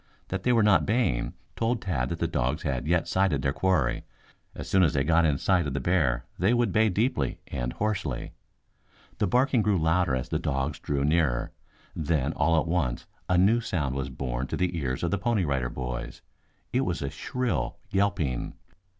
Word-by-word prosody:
That 95 0 -2
they 125 - +2
were 115 -3 +4
not 100 -7 +5
baying 110 - 0 0.2
told 115 +1 0
Tad 70 - -1
that 85 - -3
the 85 - 0
dogs 70 -1 -1
had 65 -2 -2
not - - -5
yet 85 -1 +2
sighted 95 0 +1
their 70 -1 +1
quarry. 90 -9 +1 0.5
As - - -7
soon 95 - +3
as 80 -6 +3
they 70 - +2
got 85 +3 +3
in 75 -3 +2
sight 90 +1 +2
of 70 - -3
the - - 0
bear 65 -6 +1
they 100 +7 +3
would 120 -4 +2
bay 110 +4 +3
deeply 95 - 0
and 60 0 -3
hoarsely. 95 - -2 0.9
The - - +2
barking 125 +3 +3
grew 105 -2 +2
louder 80 -3 +2
as 65 - -4
the - - 0
dogs 70 +1 -2
drew 70 -1 -1
nearer, 75 -6 +1 0.4
then 75 -2 0
all 80 -1 +3
at 80 - -2
once 80 -8 -1 0.2
a 90 - +3
new 105 +6 +4
sound 75 - -2
was 70 0 -3
borne 65 0 -3
to - - -3
the 90 -1 0
ears 65 -4 -2
of 85 - 0
the 100 - 0
Pony 110 -4 +1
Rider 65 -4 -1
Boys. 60 -1 -5 0.5
It 130 - +3
was 90 - -2
a 70 - -3
shrill 120 - -2
yelping. 95 -10 0
80 Hz, 200 wpm, -27 LUFS, 70-95 Hz, 0.9 s, not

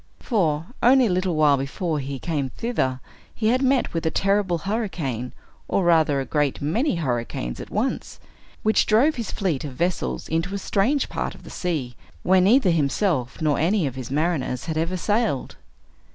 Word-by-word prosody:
For, 165 - 0 0.2
only 255 +1 +6
a 210 - +1
little 180 -1 0
while 150 -2 +4
before 150 +4 -2
he 135 0 -4
came 145 -2 -2
thither, 130 - -2 0.4
he 215 -1 +1
had 255 +2 +2
met 265 -1 +2
with 165 - -2
a 160 - +2
terrible 195 0 +1
hurricane, 165 - -3 0.4
or 195 - +1
rather 160 -5 +3
a 135 - -2
great 145 -2 0
many 205 - 0
hurricanes 120 - -3
at - - -8
once, - - -2 0.4
which 215 0 +3
drove 245 +9 +4
his 235 -6 -5
fleet 175 -9 -1
of 145 -3 -6
vessels 175 +6 -2
into 165 +5 -1
a - - -1
strange 220 +8 +1
part - - -4
of - - -16
the - - -11
sea, 150 -9 -3 0.3
where 185 0 +4
neither 200 0 +4
himself 150 - 0
nor 150 -2 +2
any 180 +2 +2
of 135 - -2
his 130 -2 -7
mariners 145 -4 -1
had 160 -1 -3
ever 165 +4 -1
sailed. 205 - 0
170 Hz, 180 wpm, -23 LUFS, 140-200 Hz, 0.4 s, only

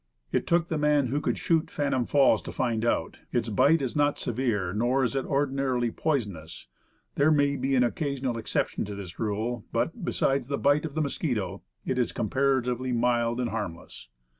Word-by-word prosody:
It - - 0
took 170 0 +2
the 160 -3 -2
man 150 -3 +3
who 145 +4 0
could - - -1
shoot 165 -2 +1
Phantom 140 -4 -1
Falls 140 -2 +4
to - - -7
find 115 -3 -1
out, 120 - 0
"Its 120 -2 0
bite 140 +8 +4
is 130 - -3
not 145 -1 +2
severe, 110 -7 -1
nor 120 +5 +1
is 125 - -1
it 135 - -1
ordinarily 135 -4 0
poisonous. 105 - -3 0.5
There 140 +2 +3
may 145 -2 +3
be 135 0 0
an 125 - +4
occasional 135 -1 -1
exception - - -1
to 100 0 -6
this 95 -4 -9
rule; 110 +2 -2
but - - -1
beside 135 -2 +1
the 140 +2 -2
bite 145 +2 +2
of 155 -2 -6
the 155 - +1
mosquito, 110 - -2 0.2
it 130 - -1
is 125 - 0
comparatively 130 +1 0
mild 120 0 +1
and 120 -2 -1
harmless." 85 - -6
130 Hz, 185 wpm, -27 LUFS, 115-140 Hz, 0.5 s, Falls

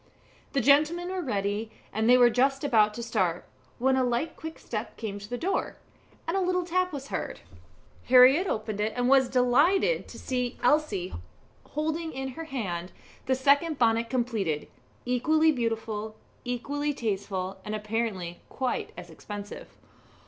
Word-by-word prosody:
The 275 - +2
gentlemen 310 +7 +3
were 375 0 -2
ready, 205 - -2 0.2
and 220 +2 +1
they 250 - +8
were 245 -1 +6
just 270 +3 +2
about 215 -6 +3
to 235 - -5
start, 185 -7 0 0.3
when 265 +2 +2
a 260 - +2
light 245 +6 -1
quick 320 0 -8
step 215 -1 -6
came 205 -3 -5
to 205 +1 -10
the 245 - -3
door, 375 +9 -2 0.5
and 335 - 0
a 390 - +2
little 365 -1 0
tap 365 +1 0
was 280 -2 -7
heard. - - -4 0.6
Harriett 260 +8 +7
opened 215 - -3
it, 215 +1 0
and 245 0 +1
was 265 -1 +5
delighted 285 - +3
to - - -11
see 250 -1 -2
Elsie 245 - +1 0.6
holding 320 +2 -2
in 265 0 -4
her 325 +6 -7
hand 185 - -4 0.4
the 260 - +3
second 285 +4 +3
bonnet 230 -1 +2
completed 225 - -1 0.4
equally 310 +6 +3
beautiful, 225 -4 -3 0.3
equally 285 +4 -2
tasteful, 195 -4 -3
and 210 0 -4
apparently 210 -5 -3
quite 260 -2 -2
as - - -9
expensive. 205 -1 -8
245 Hz, 155 wpm, -28 LUFS, 215-290 Hz, 0.6 s, they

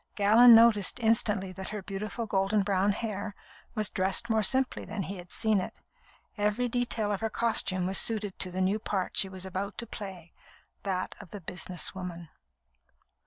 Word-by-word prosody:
Gallon 225 +4 +7
noticed 225 -2 +4
instantly 215 -4 +1
that 190 +1 -7
her 210 -2 -6
beautiful 210 +4 -4
golden 200 0 +1
brown 195 0 +1
hair 205 -1 -4 0.4
was 215 -1 -1
dressed 195 +4 +1
more 220 0 +3
simply 260 +5 +2
than 205 -1 -4
he 195 +1 -6
had 175 0 -11
seen 220 -3 +1
it. - - -7 0.6
Every 210 +4 +1
detail 235 -3 -1
of 200 - -2
her 225 - -1
costume 200 -6 +1
was 190 +1 +4
suited 210 -4 0
to 185 - +1
the 185 +1 -3
new 195 +3 +1
part 195 -4 -3
she 195 - +4
was 190 0 -5
about 190 +2 -4
to 235 - -4
play 190 -6 -9 0.5
that 185 -2 -2
of - - -12
the 205 - -8
business 180 0 -4
woman. 175 -3 -7
200 Hz, 175 wpm, -29 LUFS, 190-220 Hz, 0.6 s, Gallon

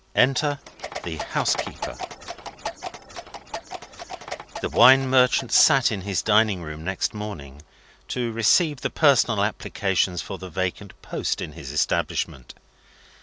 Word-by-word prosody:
ENTER 140 +3 +3 0.5
THE - - -5
HOUSEKEEPER - - -2 2.7
The - - -2
wine 135 +1 +6
merchant 130 -1 +3
sat 135 -6 +6
in 100 -3 -3
his 95 -4 -2
dining 105 -4 +3
room 75 0 -8
next 95 +2 -2
morning, 80 -10 -8 0.5
to 120 -2 -2
receive 130 - +2
the - - -1
personal 120 -8 +3
applicants 95 -3 -1
for 95 - -7
the 95 - -8
vacant 95 +3 -4
post - - -2
in - - -5
his 75 -3 -9
establishment. 70 -3 -2
105 Hz, 115 wpm, -24 LUFS, 90-125 Hz, 2.7 s, wine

